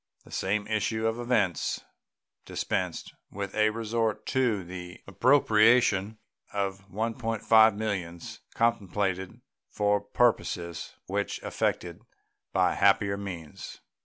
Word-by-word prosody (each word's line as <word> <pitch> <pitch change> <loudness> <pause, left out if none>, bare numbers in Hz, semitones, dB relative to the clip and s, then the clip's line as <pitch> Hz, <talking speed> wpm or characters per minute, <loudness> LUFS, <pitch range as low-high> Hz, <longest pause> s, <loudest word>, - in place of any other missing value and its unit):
The - - -17
same 100 +2 -1
issue 110 +1 -1
of 115 +1 0
events 110 - 0 0.7
dispensed - - -3 0.2
with 100 0 -5
a 110 0 +3
resort 115 0 -1
to 120 -7 +1
the 90 0 -8
appropriation 110 -2 +4 0.3
of 95 -1 -3
$1.5 110 0 +3
millions, 95 -6 -4 0.2
contemplated 100 -5 -1 0.3
for 105 0 +1
purposes 100 -6 0
which - - -2
were - - -4
effected - - -2 0.5
by - - +2
happier 100 -1 +3
means. 90 -6 -8
105 Hz, 105 wpm, -28 LUFS, 95-115 Hz, 0.7 s, appropriation